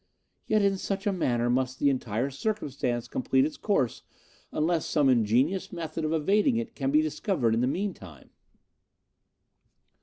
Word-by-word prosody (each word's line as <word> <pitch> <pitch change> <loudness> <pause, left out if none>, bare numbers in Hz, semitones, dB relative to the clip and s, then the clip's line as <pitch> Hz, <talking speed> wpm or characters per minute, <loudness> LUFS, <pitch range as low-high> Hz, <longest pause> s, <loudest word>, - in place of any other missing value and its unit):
Yet 215 -1 +3
in 195 -1 +2
such 195 +1 -3
a 205 - +1
manner 120 -9 0
must 130 +1 0
the 140 +1 +3
entire 125 0 -2
circumstance 135 - -2
complete 130 +2 +1
its 155 - -4
course 140 - 0 0.5
unless 160 +1 0
some 145 -4 +3
ingenious 125 - +2
method 165 -1 -5
of 155 - -1
evading 205 - +2
it 230 - -4
can 135 -2 -2
be 150 +2 +4
discovered 155 - 0
in 115 - +1
the 125 - +2
meantime. 135 - -5
145 Hz, 150 wpm, -27 LUFS, 125-190 Hz, 0.5 s, be